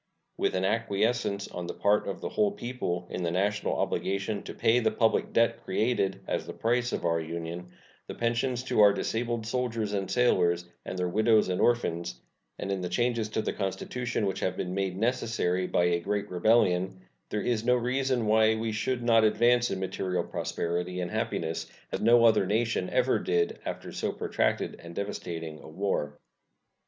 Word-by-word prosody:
With - - 0
an 95 +1 +1
acquiescence 105 -1 0
on 90 -1 -6
the - - -5
part 105 +1 +2
of 95 -2 -4
the - - -3
whole 205 -1 +1
people 120 - -3
in - - -3
the 85 - 0
national 100 +4 0
obligation 100 +2 -1
to - - -8
pay 115 +1 +3
the 110 -2 +2
public 110 +1 +1
debt 115 0 +2
created 100 -1 0
as - - -2
the - - -5
price 120 +1 0
of - - -3
our 85 -1 +2
Union, 85 +2 -5 0.4
the - - -6
pensions 120 +1 0
to 130 - -1
our 100 -1 +7
disabled 115 +1 -2
soldiers 115 -3 -1
and 100 -2 -2
sailors 90 -8 +2 0.2
and 95 - -4
their 90 0 0
widows 110 +2 +3
and 90 0 0
orphans, 85 -8 0 0.4
and 100 - -4
in 95 -1 -1
the 90 - -3
changes 115 +2 0
to 110 0 -1
the - - -2
Constitution 110 +4 -2
which 95 - -2
have 95 - -1
been 90 0 -3
made 95 -1 -1
necessary 110 -6 0
by 90 - +2
a 85 0 +2
great 100 +4 -2
rebellion, 95 -1 +2 0.3
there 105 - -2
is 115 -3 0
no 125 +1 +4
reason 125 0 0
why 110 +1 +4
we 110 0 -2
should 120 +3 -1
not 115 -1 +5
advance 120 +3 +4
in 95 - -2
material 95 -1 -2
prosperity 90 +2 -3
and 90 - -3
happiness 80 0 -2 0.2
as - - -3
no 115 +1 +6
other 105 -4 +4
nation 110 -2 0
ever - - +2
did 85 -1 0
after - - -5
so - - -2
protracted - - -1
and 85 0 -10
devastating 85 -6 -5
a - - -12
war. 75 -5 -2
105 Hz, 185 wpm, -28 LUFS, 90-115 Hz, 0.4 s, our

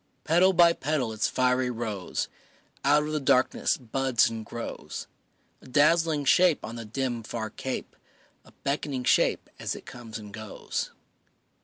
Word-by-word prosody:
Petal 175 +4 +5
by 170 -2 +6
petal 140 -8 -1
its 110 - +1
fiery 125 0 +2
rose 110 -5 -3 0.6
Out 145 +2 +4
of 150 - -4
the 155 - 0
darkness 130 -2 +2
buds 130 -1 +1
and 110 -1 -5
grows; 115 +2 -6 0.6
A - - -15
dazzling 150 +2 +3
shape 175 +2 +4
on 110 +2 -7
the 115 -1 -6
dim, 120 +1 -2
far 110 0 -5
cape, 130 +3 -5 0.5
A - - -19
beckoning 140 -2 -1
shape - - +3
as - - -2
it - - -11
comes 115 -3 -8
and 105 -2 -10
goes. 110 -2 -4
130 Hz, 150 wpm, -27 LUFS, 115-150 Hz, 0.6 s, by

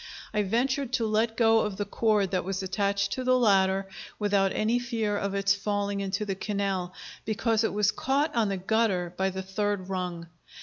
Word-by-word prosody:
I 210 - +2
ventured 255 +5 0
to 235 -3 +1
let 220 +1 0
go 225 -1 +5
of 210 -3 -2
the 205 - -2
cord 210 -4 +1
that 185 - 0
was 190 +1 -3
attached 200 +1 0
to 255 - -2
the 255 0 +3
ladder 195 -4 +3 0.3
without 200 -2 +2
any 225 +3 +1
fear 225 -4 -1
of 200 -1 -2
its 200 0 +3
falling 200 0 -2
into 195 +2 -2
the 195 - -2
canal, 195 -2 -2 0.3
because 225 +1 0
it - - +1
was 210 0 +2
caught 280 +4 0
on 225 -3 +1
the 195 - -1
gutter 190 -3 0
by 190 +1 +1
the 190 0 -5
third 195 0 -2
rung. 180 -3 -3
205 Hz, 190 wpm, -27 LUFS, 195-225 Hz, 0.3 s, go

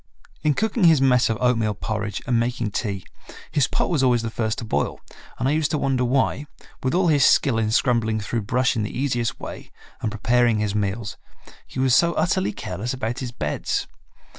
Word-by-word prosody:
In 150 -2 +2
cooking 220 -2 +1
his 160 -4 +6
mess 125 -2 +4
of 110 - 0
oatmeal 115 -4 +1
porridge 105 0 -4
and 120 -2 +2
making 120 -2 -1
tea, 100 -4 -3 0.5
his 140 -3 +2
pot - - 0
was 155 -6 +2
always 125 -3 +3
the 115 - -3
first 110 -1 -1
to 115 - -5
boil, 110 - -1 0.4
and 125 - 0
I - - +2
used 155 0 +1
to 155 - 0
wonder 135 -3 0
why, 130 +3 0 0.3
with 130 +5 0
all 180 -1 +3
his 145 -3 +4
skill 125 -4 +4
in 110 -1 0
scrambling 110 -2 +1
through 110 +3 -2
brush 125 +5 +1
in 110 - 0
the 105 - -4
easiest 120 -4 -1
way, - - -8 0.3
and 110 - -1
preparing 120 +1 +2
his 105 -1 -1
meals, 105 +1 -2 0.5
he - - -11
was 130 -1 +3
so 170 +6 +4
utterly 170 - +1
careless 105 +5 -4
about 120 -1 -3
his 125 -2 -4
beds. 75 -11 -2
120 Hz, 200 wpm, -23 LUFS, 110-135 Hz, 0.5 s, his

